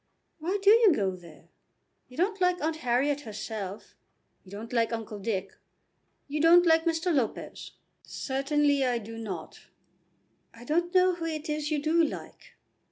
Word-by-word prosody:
"Why 355 Hz, +6 st, -1 dB
do 405 Hz, -, +7 dB
you 445 Hz, -5 st, +6 dB
go 190 Hz, -5 st, -1 dB
there? 170 Hz, -4 st, -16 dB, 0.6 s
You 250 Hz, -, -15 dB
don't 395 Hz, +3 st, 0 dB
like 360 Hz, 0 st, +2 dB
Aunt 315 Hz, +1 st, -1 dB
Harriet 275 Hz, +2 st, 0 dB
herself. 215 Hz, -3 st, -7 dB, 0.5 s
You 185 Hz, -, -17 dB
don't 215 Hz, +5 st, -8 dB
like 230 Hz, -1 st, +1 dB
Uncle 225 Hz, -2 st, -5 dB
Dick. 195 Hz, -2 st, -3 dB, 0.7 s
You 295 Hz, +1 st, -2 dB
don't 345 Hz, +2 st, +7 dB
like 325 Hz, 0 st, +4 dB
Mr. 330 Hz, +1 st, 0 dB
Lopez." 255 Hz, -7 st, -3 dB, 0.3 s
"Certainly 285 Hz, +1 st, 0 dB
I 250 Hz, -2 st, +1 dB
do 225 Hz, 0 st, -8 dB
not." 190 Hz, -8 st, -7 dB, 0.9 s
"I 230 Hz, -, -13 dB
don't 345 Hz, +6 st, 0 dB
know 370 Hz, 0 st, +5 dB
who 340 Hz, -1 st, -5 dB
it 315 Hz, -1 st, -4 dB
is 300 Hz, -1 st, -2 dB
you 305 Hz, -2 st, 0 dB
do 320 Hz, +3 st, +2 dB
like." 310 Hz, -, -6 dB
290 Hz, 160 wpm, -28 LUFS, 225-330 Hz, 0.9 s, do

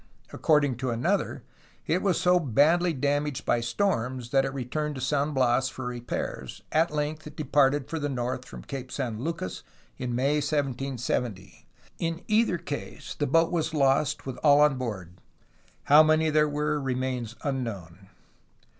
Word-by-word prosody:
According 145 Hz, -5 st, +2 dB
to 130 Hz, 0 st, -2 dB
another 120 Hz, +1 st, -1 dB, 0.4 s
it 175 Hz, +4 st, +1 dB
was 190 Hz, -4 st, +1 dB
so 180 Hz, 0 st, +4 dB
badly 165 Hz, +5 st, +3 dB
damaged 145 Hz, -1 st, -1 dB
by 120 Hz, -, +2 dB
storms 120 Hz, -, -1 dB
that 135 Hz, -1 st, +3 dB
it 135 Hz, -, -2 dB
returned 145 Hz, +3 st, -3 dB
to -, -, -5 dB
San 145 Hz, +3 st, 0 dB
Bias 130 Hz, -1 st, +2 dB
for 130 Hz, -1 st, -7 dB
repairs. 120 Hz, -, -5 dB
At 160 Hz, +2 st, +3 dB
length 150 Hz, +1 st, -3 dB
it 150 Hz, -, -11 dB
departed 145 Hz, -2 st, +2 dB
for 165 Hz, -, -3 dB
the 145 Hz, -1 st, -2 dB
north 125 Hz, -1 st, -2 dB
from -, -, -10 dB
Cape 130 Hz, -2 st, -7 dB
San 120 Hz, -6 st, -3 dB
Lucas 165 Hz, +3 st, -4 dB, 0.4 s
in 125 Hz, -2 st, -2 dB
May 140 Hz, +4 st, +2 dB
1770. 130 Hz, -8 st, -2 dB, 0.3 s
In 165 Hz, +1 st, -2 dB
either 215 Hz, -4 st, +3 dB
case 145 Hz, -3 st, -6 dB
the 145 Hz, -, -2 dB
boat 165 Hz, +4 st, +3 dB
was 165 Hz, -2 st, -1 dB
lost 135 Hz, 0 st, +2 dB
with 130 Hz, -2 st, -5 dB
all 145 Hz, +1 st, +5 dB
on 150 Hz, -3 st, +4 dB
board; 95 Hz, -8 st, -5 dB, 0.7 s
how 150 Hz, +2 st, +7 dB
many 155 Hz, 0 st, +3 dB
there 150 Hz, 0 st, +3 dB
were 150 Hz, 0 st, -1 dB
remains 130 Hz, -3 st, -2 dB
unknown. 100 Hz, -, -4 dB
140 Hz, 155 wpm, -27 LUFS, 125-150 Hz, 0.7 s, how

